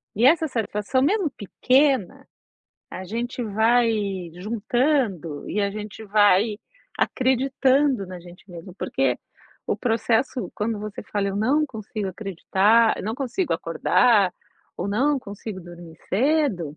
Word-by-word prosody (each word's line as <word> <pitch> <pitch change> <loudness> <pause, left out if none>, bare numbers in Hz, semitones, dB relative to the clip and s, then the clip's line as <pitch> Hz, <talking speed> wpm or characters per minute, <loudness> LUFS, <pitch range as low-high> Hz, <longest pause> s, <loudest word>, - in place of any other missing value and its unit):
E 225 +4 +3
essa 320 +3 +5
satisfação, 225 -1 -1
mesmo 360 +4 +2
pequena, 255 +1 +1 0.6
a 185 - -7
gente 235 +5 -4
vai 220 -4 +1
juntando 215 - -1
e 210 - -1
a 200 0 0
gente 210 +1 -8
vai 205 0 +3 0.4
acreditando 265 -2 +1
na 180 -1 -9
gente 175 +3 -15
mesmo, 175 +1 -10
porque - - -1 0.5
o - - 0
processo 230 +2 0
quando 215 +1 -2
você 210 0 -7
fala: 200 -1 -2
"Eu 195 - -3
não 265 +9 +2
consigo 215 -4 -5
acreditar, 200 +4 +2
eu - - -6
não 220 +2 -2
consigo 275 +8 -2
acordar." 205 -7 +2 0.4
Ou: 180 - -3
"Não 270 +8 +1
consigo 200 -3 -8
dormir 175 -2 -12
cedo." 220 - +1
215 Hz, 130 wpm, -23 LUFS, 195-255 Hz, 0.6 s, essa